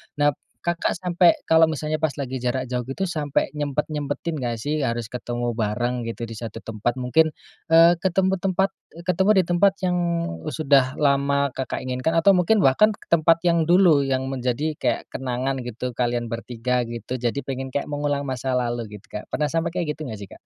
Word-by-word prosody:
Nah, 145 0 +3 0.3
Kakak 170 0 -1
sampai 175 -1 +3
kalau 160 0 +5
misalnya 155 +1 -3
pas 155 - +3
lagi 130 -1 -3
jarak 130 +1 -2
jauh 125 -1 -2
gitu 135 +10 -3
sampai 150 -4 0
nyempet-nyempetin 150 +2 -2
enggak 120 -2 -2
sih 145 +4 -1
harus 115 -2 -2
ketemu 120 -1 -3
bareng 120 +2 -1
gitu 115 0 -5
di 115 - -8
satu 115 0 -7
tempat, 115 +3 -3
mungkin, 160 +6 +3 0.4
eee, 165 +1 +7
ketemu 190 +1 +2
tempat, 190 +1 +1 0.4
ketemu 190 +3 +3
di 185 - +4
tempat 185 +3 +4
yang 180 0 +1 0.5
sudah 135 -4 +2
lama 140 0 +2
Kakak 130 - -3
inginkan 130 +5 -1
atau 175 +4 +5
mungkin 190 +5 +3
bahkan 205 +9 +5
ke - - -12
tempat 165 0 +4
yang 170 -1 +3
dulu 170 -4 +5 0.2
menjadi 135 +4 -2
kayak 120 -5 -1
kenangan 130 0 -2
gitu 125 +1 -5
kalian 120 -1 -1
bertiga 120 +2 -2
gitu, 120 +1 -5
jadi 120 +2 -1
pengen 135 -1 -5
kayak 145 - -2
mengulang 145 -1 -2
masa 130 0 -2
lalu 120 -4 -2
gitu, - - -26
Kak. 105 - -8
Pernah 150 - 0
sampai 165 +2 -1
kayak 170 -4 -2
gitu 155 - -7
enggak 110 -7 -6
sih, 100 - -8
Kak? - - -14
140 Hz, 180 wpm, -23 LUFS, 120-160 Hz, 0.5 s, eee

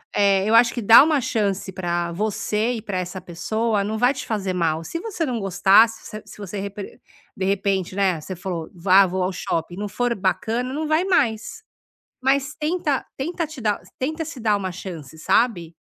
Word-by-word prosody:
eh, 200 -1 +3
eu 230 - +4
acho 235 0 +6
que 240 - -3
dar 225 +5 +9
uma 300 -3 +2
chance 200 -5 -1
pra 175 -2 -2
você 215 +4 -1
e 225 - -5
pra 195 -3 -4
essa 180 +1 -4
pessoa 210 +5 -1
não 215 +2 -3
vai 245 +3 +4
te 260 - -6
fazer 195 -4 -2
mal, 165 -2 0
se 335 - -5
você 395 -6 -3
não 245 -3 -2
gostar, 195 +3 +5
se 225 - -11
você 215 0 -8
se - - -13
você 200 0 -6
repe 200 0 -7 0.4
de 190 - -1
repente, 195 -2 0
né, 190 -5 +1
você 185 +4 -7
falou, 175 -2 -5
vá, 190 +2 +5
vou 185 +1 -2
ao 185 +1 0
shopping, 170 -1 -3
não 205 +1 -3
for 245 +3 -1
bacana, 230 +6 -1
não 310 +1 -2
vai 310 +3 +2
mais, 255 - 0 0.6
mas 275 +2 +1
tenta 305 -3 -1
tenta 330 +4 -2
te 295 -4 -10
dar 210 -2 0 0.2
tenta 315 +5 -2
se 300 -5 -8
dar 215 -2 +2
uma 190 -2 -4
chance, 165 -6 -8
sabe. 175 -4 +1
205 Hz, 200 wpm, -22 LUFS, 185-245 Hz, 0.6 s, dar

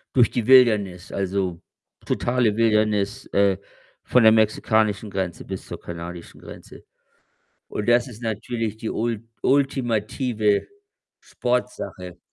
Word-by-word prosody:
Durch 120 -3 +5
die 120 -2 -2
Wildnis, 105 -9 +4
also 95 -3 -2 0.4
totale 120 -3 +1
Wildnis, 105 -2 +1
äh, 100 -1 +3 0.5
von 125 - +3
der 110 - +8
mexikanischen 110 -1 +2
Grenze 95 -3 -4
bis 95 -1 -7
zur - - -7
kanadischen 85 0 -8
Grenze - - -13 0.8
und 105 - -4
das 120 0 +4
ist 120 -4 -11
natürlich 110 0 -3
die 110 0 -5
ult 115 -1 -2 0.2
ultimative 120 -5 +1 0.5
Sportsache. 120 -7 -3
110 Hz, 110 wpm, -23 LUFS, 100-120 Hz, 0.8 s, der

